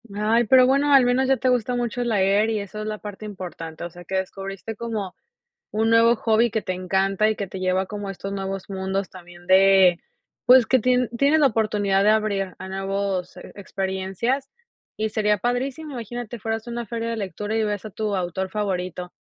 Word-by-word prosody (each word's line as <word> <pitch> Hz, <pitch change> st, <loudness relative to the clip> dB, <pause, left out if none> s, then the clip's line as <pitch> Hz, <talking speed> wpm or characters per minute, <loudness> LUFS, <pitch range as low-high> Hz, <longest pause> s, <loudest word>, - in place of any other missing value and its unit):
Ay, 220 Hz, +3 st, +2 dB
pero 255 Hz, +3 st, +6 dB
bueno 280 Hz, +2 st, +3 dB
al 270 Hz, -2 st, +7 dB
menos 250 Hz, +2 st, +2 dB
ya 270 Hz, 0 st, +3 dB
te 255 Hz, +2 st, +1 dB
gusta 250 Hz, 0 st, +1 dB
mucho 245 Hz, 0 st, -2 dB
leer 205 Hz, -1 st, +2 dB
y 220 Hz, -1 st, 0 dB
eso 205 Hz, +1 st, -7 dB
es -, -, -4 dB
la 215 Hz, 0 st, -3 dB
parte 210 Hz, 0 st, -8 dB
importante, 175 Hz, -5 st, -7 dB
o 170 Hz, -, -4 dB
sea 175 Hz, +1 st, -13 dB
que 190 Hz, -, -4 dB
descubriste 195 Hz, +3 st, -4 dB
como, 215 Hz, -4 st, -4 dB, 0.6 s
un 220 Hz, +1 st, +1 dB
nuevo 230 Hz, +1 st, +5 dB
hobby 225 Hz, +1 st, +2 dB
que 220 Hz, 0 st, -1 dB
te 185 Hz, -, -3 dB
encanta 190 Hz, +3 st, +1 dB
y 220 Hz, -, +1 dB
que 200 Hz, -, -3 dB
te 190 Hz, -, -7 dB
lleva 185 Hz, +1 st, 0 dB
como 205 Hz, 0 st, -6 dB
a -, -, -3 dB
estos 195 Hz, +1 st, -6 dB
nuevos 195 Hz, 0 st, -5 dB
mundos 190 Hz, 0 st, -3 dB
también 175 Hz, -1 st, -14 dB
de, 190 Hz, -2 st, +6 dB, 0.5 s
pues 250 Hz, -2 st, +7 dB
que 260 Hz, -, +4 dB
tie 250 Hz, 0 st, +2 dB
tienes 285 Hz, +4 st, +4 dB
la 285 Hz, -, +6 dB
oportunidad 210 Hz, -4 st, +1 dB
de 210 Hz, -, +5 dB
abrir 205 Hz, -3 st, 0 dB
a 190 Hz, -, -7 dB
nuevos 195 Hz, -1 st, -3 dB
e -, -, -11 dB
experiencias 195 Hz, +7 st, -2 dB, 0.5 s
y 220 Hz, 0 st, -1 dB
sería 210 Hz, -1 st, +2 dB
padrísimo, 260 Hz, +7 st, -2 dB
imagínate 240 Hz, -1 st, -6 dB
fueras 225 Hz, +2 st, -3 dB
a -, -, -5 dB
una 235 Hz, 0 st, -4 dB
feria 230 Hz, +2 st, -3 dB
de 230 Hz, -, -2 dB
lectura 210 Hz, +1 st, -4 dB
y 220 Hz, -, +1 dB
ves 205 Hz, -1 st, -3 dB
a 215 Hz, -, -6 dB
tu 210 Hz, +1 st, -3 dB
autor 185 Hz, +1 st, -2 dB
favorito, 180 Hz, -3 st, -3 dB
210 Hz, 205 wpm, -23 LUFS, 190-230 Hz, 0.6 s, al